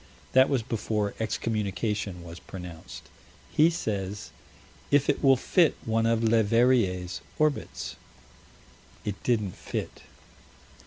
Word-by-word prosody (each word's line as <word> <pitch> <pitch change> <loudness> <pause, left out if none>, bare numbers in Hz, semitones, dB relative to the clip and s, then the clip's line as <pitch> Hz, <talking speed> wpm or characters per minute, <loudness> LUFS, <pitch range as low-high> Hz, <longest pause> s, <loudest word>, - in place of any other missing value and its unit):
That 130 +1 +6
was 130 -5 +1
before 110 -3 -1
excommunication 105 -4 -2
was 85 0 -9
pronounced. 90 -3 -9 0.5
He 155 +2 +6
says: 105 - -3 0.6
"If 145 -1 +3
it - - -6
will 135 -1 +7
fit 165 +5 +3
one 115 0 +1
of 115 0 +2
Leverrier's 110 -4 +2 0.2
orbits" 155 -2 -1 1.1
It 100 -1 -4
didn't 105 -7 0
fit. - - -5
110 Hz, 105 wpm, -27 LUFS, 100-125 Hz, 1.1 s, will